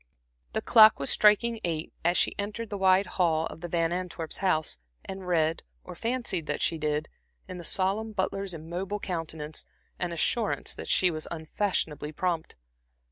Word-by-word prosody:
The - - -1
clock 220 -2 +8
was 140 - +1
striking 220 +2 +4
eight 165 -2 -2
as 175 +2 +3
she - - +2
entered 210 +2 -4
the 205 - -2
wide 190 +1 +5
hall 165 -4 +1
of 160 - -8
the 175 - -4
Van 165 -1 +1
Antwerps's 175 -3 -3
house, 160 - +1 0.3
and 190 -1 -7
read, 165 -2 +2 0.2
or - - -8
fancied 230 -9 -2
that - - -1
she 165 - 0
did, 150 0 -1 0.4
in 185 - -7
the - - -7
solemn 200 +6 0
butler's 195 -2 -2
immobile 180 +6 -4
countenance, 160 -4 -4 0.4
an 175 - -1
assurance 205 +6 0
that - - -8
she 180 -1 +3
was 155 -1 -4
unfashionably 160 -2 -2
prompt. 170 0 -2
175 Hz, 165 wpm, -28 LUFS, 160-195 Hz, 0.4 s, clock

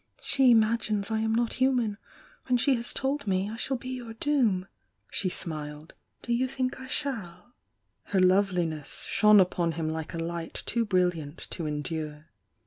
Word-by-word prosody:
She 265 -4 +5
imag 220 0 +2
ines 210 0 -1
I 220 - +1
am 220 0 +1
not 235 0 +1
human, 245 -5 +2 0.5
and 250 -1 +3
she 275 +3 +4
has 235 -1 0
told 275 -1 -2
me 190 0 +1
I - - -5
shidl 255 +2 -2
be 255 - -6
your 240 -3 -6
doom!" 230 -10 +1 0.5
She 190 - +1
smiled. 155 -3 -5 0.3
"Do 240 - -1
you 255 +2 +1
think 260 -1 -2
I 260 - -8
shaU?" 245 - -4 0.5
Her 195 - +1
loveliness 180 -5 +1
shone 210 -1 +6
upon 175 -2 +2
him 160 0 -2
like 160 +2 -5
a - - -3
light 165 0 -4
too 235 -1 +1
brilliant 175 -6 0
to 165 -3 -3
endure. 150 +1 -4
205 Hz, 170 wpm, -28 LUFS, 170-240 Hz, 0.5 s, shone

